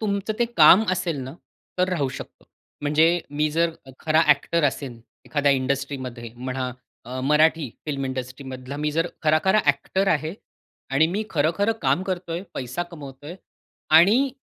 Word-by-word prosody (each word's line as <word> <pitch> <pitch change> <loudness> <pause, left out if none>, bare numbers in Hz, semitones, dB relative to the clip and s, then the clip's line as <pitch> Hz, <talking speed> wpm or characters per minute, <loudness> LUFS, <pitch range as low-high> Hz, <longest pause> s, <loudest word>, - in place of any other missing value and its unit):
तुमचं 200 0 -1
ते 240 - +3
काम 175 +7 +8
असेल 180 -3 -1
ना, 130 +4 -8 0.4
तर 180 - +2
राहू 160 -7 0
शकतो. 130 - -10 0.4
म्हणजे 160 +4 +3 0.2
मी 150 +1 +2
जर 165 +2 +1 0.2
अ, 135 - -11
खरा 155 0 +3
ॲक्टर 160 +3 +3
असेन 130 -4 -2 0.2
एखाद्या 145 -1 +1
इंडस्ट्रीमध्ये 130 -3 -3
म्हणा, 130 0 -4 0.3
अ, 130 +2 -5
मराठी 150 0 +3 0.2
फिल्म 140 -2 -2
इंडस्ट्रीमधला 130 +1 -6
मी 150 +1 -1
जर 165 +2 +1 0.2
खरा-खरा 165 +7 +3
ॲक्टर 165 +7 +1
आहे 155 0 0 0.6
आणि 140 +4 +4
मी 205 +6 -2
खरं-खरं 165 +8 +1
काम 185 - +2
करतोय, 180 -2 -4
पैसा 130 +7 -3
कमवतोय 150 -2 -10 0.6
आणि 225 +11 +5
150 Hz, 145 wpm, -23 LUFS, 135-175 Hz, 0.6 s, काम